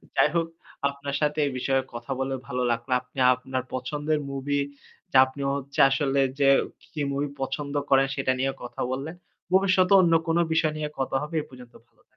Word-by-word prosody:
যাই - - +4
হোক, 165 -1 +1 0.4
আপনার 140 0 -5
সাথে 150 0 +1
এই 140 - -1
বিষয়ে 135 +1 +1
কথা 120 +3 -7
বলে 135 0 -1
ভালো 125 0 -2
লাগলো। 120 +1 -3
আপনি 125 +1 -11 0.2
আপনার 130 0 -4
পছন্দের 145 +4 -1
movie, 140 +1 -1 0.5
যে 135 - +4
আপনি 130 +2 -9
হচ্ছে 140 0 -5
আসলে 140 0 +1 0.2
যে 140 -1 +5 0.4
কি 150 - -3
movie 140 +1 -2
পছন্দ 140 +2 -3 0.2
করেন 135 0 +5
সেটা 135 -1 +1
নিয়ে 135 +1 +1
কথা 120 0 -7
বললেন। 140 +6 -4 0.4
ভবিষ্যতে 185 0 +4
অন্য 170 -2 +3
কোন 165 0 +2 0.2
বিষয় 155 -1 +2
নিয়ে 150 -1 -3
কথা 135 0 -1
হবে 150 +3 -5
এ - - -3
পর্যন্ত 125 -2 -14
ভালো - - -40
থাক - - -28
140 Hz, 185 wpm, -26 LUFS, 130-150 Hz, 0.5 s, যে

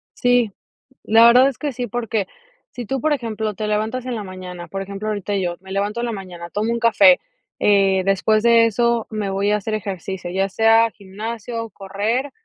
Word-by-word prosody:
Sí, 245 -3 +2 0.5
la 225 +2 +6
verdad 250 +3 +7
es 275 - -6
que 295 -2 -3
sí, 245 0 -4
porque, 230 -4 -2 0.4
si 245 - -7
tú, 270 +4 -2
por 310 +3 +1
ejemplo, 220 -4 -3
te 215 +2 -4
levantas 220 +4 -1
en 250 - -3
la 220 - -4
mañana, 180 -2 -8
por 195 0 -4
ejemplo, 200 +2 -6
ahorita 205 -1 -3
yo 175 -3 -2
me 190 0 -10
levanto 205 +3 -1
en 240 - -1
la 235 - -3
mañana, 180 -4 -8
tomo 215 +4 -1
un 235 - -1
café, 265 +4 +5 0.4
eh, 195 -2 +3
después 195 +3 +2
de 230 0 +5
eso 235 +1 +1
me 215 -3 -3
voy 195 +1 0
a 210 - +3
hacer 210 +1 -4
ejercicio, 190 -3 -5
ya 190 +2 0
sea 225 +2 +4
gimnasio, 225 +3 -6
correr, 210 +9 -2
215 Hz, 200 wpm, -20 LUFS, 195-235 Hz, 0.5 s, verdad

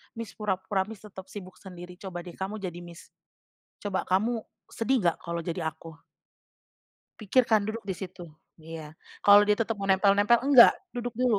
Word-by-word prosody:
Miss, 230 -1 -6
pura-pura 190 -2 -2
Miss, 215 -2 -11
tetap 190 -2 -11
sibuk 185 -3 -10
sendiri. 180 -2 -11
Coba 175 -3 -7
deh 175 - -9
kamu 195 +3 -4
jadi 175 -2 -5
Miss, 175 0 -13 0.7
coba 200 -2 -2
kamu 220 +5 0 0.3
sedih 250 +2 0
nggak, 170 - +2
kalau 170 0 -3
jadi 170 0 -4
aku?" 160 +1 -13 1.3
"Pikirkan, 220 0 +3
duduk 220 -1 -5
di 190 - -1
situ" 180 -1 -8 0.5
iya, 165 -1 -7 0.4
kalau 205 0 +8
dia 210 0 +3
tetep 225 0 0
mau 195 0 -4
nempel-nempel, 205 +4 +4
"Nggak! 250 -4 +9 0.2
Duduk 245 -1 -4
dulu." 240 -5 +3
195 Hz, 165 wpm, -27 LUFS, 180-220 Hz, 1.3 s, Nggak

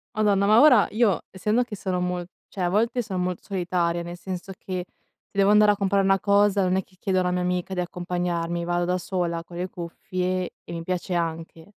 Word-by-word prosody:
Madonna, 200 -2 +3
ma 215 +3 +6
ora 250 -8 +7
io, 215 -4 +2
essendo 210 +6 +1
che 220 -4 -6
sarò 185 -2 -2
mol 180 -1 -2 0.2
cioè, 185 -3 -3
a - - +2
volte 230 +5 +1
son 190 -4 -4
molto 180 -1 -3
solitaria, 175 -3 -1
nel 175 +1 -7
senso 185 +1 -6
che, 185 -2 -5
se - - -27
devo 195 +1 +5
andare 210 0 +6
a - - -2
comprar 195 0 +2
una 195 0 +3
cosa, 200 0 +3
non 185 0 +2
è 190 - +1
che 185 - -26
chiedo 190 -2 0
a - - +4
una 180 - 0
mia 180 0 0
amica 180 +1 -1
di 180 - -1
accompagnarmi, 175 -1 -2
vado 175 0 0
da 180 0 +1
sola 175 -2 -2
con 175 0 -10
le 180 +1 -2
cuffie 180 +1 -3
e - - -9
mi 165 -1 -4
piace 180 +1 -3
anche. 165 0 -3
185 Hz, 225 wpm, -25 LUFS, 175-200 Hz, 0.2 s, ora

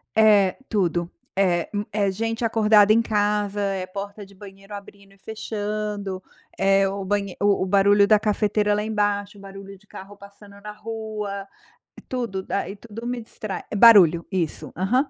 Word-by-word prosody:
É 210 -4 +4
tudo, 175 -5 0 0.3
é, 180 -3 +1
hum, 205 0 -1
é 200 -2 0
gente 225 +4 -3
acordada 215 -2 +4
em 230 - +4
casa, 210 -2 -1
é 195 -2 -2
porta 200 +2 -7
de 200 0 -16
banheiro 195 +1 -14
abrindo 200 0 -13
e - - -23
fechando, 210 -2 -5 0.3
é 195 0 +3
o 195 0 -4
banhe 200 -1 -2
o 200 -2 +2
o - - -1
barulho 200 +1 +4
da 215 0 +5
cafeteira 210 0 +1
lá 210 - -1
embaixo, 205 -1 -2
o - - -14
barulho 195 0 -11
de 205 +2 -23
carro 195 +1 -11
passando 200 0 -15
na 210 +1 -8
rua. 210 -2 -6 0.6
Tudo, 235 -7 -3
daí 200 0 -3
tudo 230 +2 -9
me 245 -1 -3
distrai. 215 -3 -7
É - - -3
barulho, 195 -7 +7
isso. 175 -5 -3
Aham. 245 - 0
205 Hz, 165 wpm, -23 LUFS, 195-215 Hz, 0.6 s, barulho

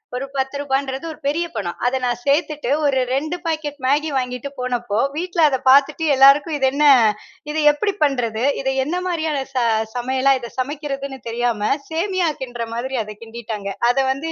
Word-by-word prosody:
ஒரு 260 - -3
ரூ.10ன்றது 270 +1 -2
ஒரு - - -11
பெரிய 330 +4 0
பணம். 195 -6 -4
அத 260 +1 +1
நான் 240 -1 -1
சேர்த்துட்டு 295 -2 0
ஒரு 270 -2 +2
2 310 +6 -1
பாக்கெட் 305 -3 -3
மேகி 295 +4 +2
வாங்கிட்டு 250 +1 -3
போனப்போ, 240 -4 -1 0.2
வீட்டுல 350 +1 -1
அத 265 - 0
பாத்துட்டு 285 +4 +4
எல்லாருக்கும் 280 +3 +6
இது 265 -1 +2
என்ன? 290 +2 0 0.7
இத 300 - -4 0.2
எப்படி 400 +7 -1
பண்ணுறது? 240 -5 0 0.2
இத 265 - -5 0.2
என்ன 320 +6 -2
மாரியான 315 -4 -1
ச - - -32 0.4
சமையலா, 260 +2 +2
இத 235 -1 -8
சமைக்குறதுன்னு 275 -1 -4
தெரியாம. 230 -3 -1 0.2
சேமியா 355 +2 0
கிண்ட்ற 240 -2 -4
மாதிரி 260 +2 -3
அத 210 0 -9
கிண்டிட்டாங்க. 220 -3 -6 0.2
அத 245 - +1
வந்து 310 +5 -3
270 Hz, 160 wpm, -20 LUFS, 245-300 Hz, 0.7 s, எல்லாருக்கும்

